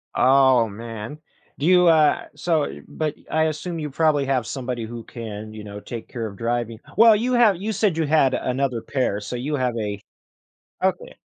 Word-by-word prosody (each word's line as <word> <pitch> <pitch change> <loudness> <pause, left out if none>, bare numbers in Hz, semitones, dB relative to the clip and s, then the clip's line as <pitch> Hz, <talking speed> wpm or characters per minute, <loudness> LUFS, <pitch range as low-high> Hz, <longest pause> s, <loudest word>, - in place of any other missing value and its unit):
Oh, 130 -3 +5
man. 115 +5 -7 0.4
Do 145 - -1
you, 180 -1 +6
uh 155 -2 +4
so 160 -4 0 0.2
but 155 -2 -3 0.2
I 160 0 +2
assume 160 +2 -3
you 150 -1 -4
probably 150 -2 +2
have 130 -4 0
somebody 125 -3 -4
who 115 0 -8
can, 110 -2 -8
you 105 -1 -8
know, 105 0 -8
take 115 +1 -8
care 115 -3 -5
of 100 - -9
driving. 115 -1 -2 0.2
Well, 225 0 +8
you 245 +4 0
have 225 -7 +5
you 210 +4 -3
said 205 -5 +1
you 160 - +1
had 145 -3 +3
another 125 -2 -1
pair, 125 -7 -1
so 125 - -5
you 145 +5 -2
have 125 -3 -1
a 105 -2 -3 0.8
Okay. - - -1
130 Hz, 185 wpm, -23 LUFS, 115-160 Hz, 0.8 s, Well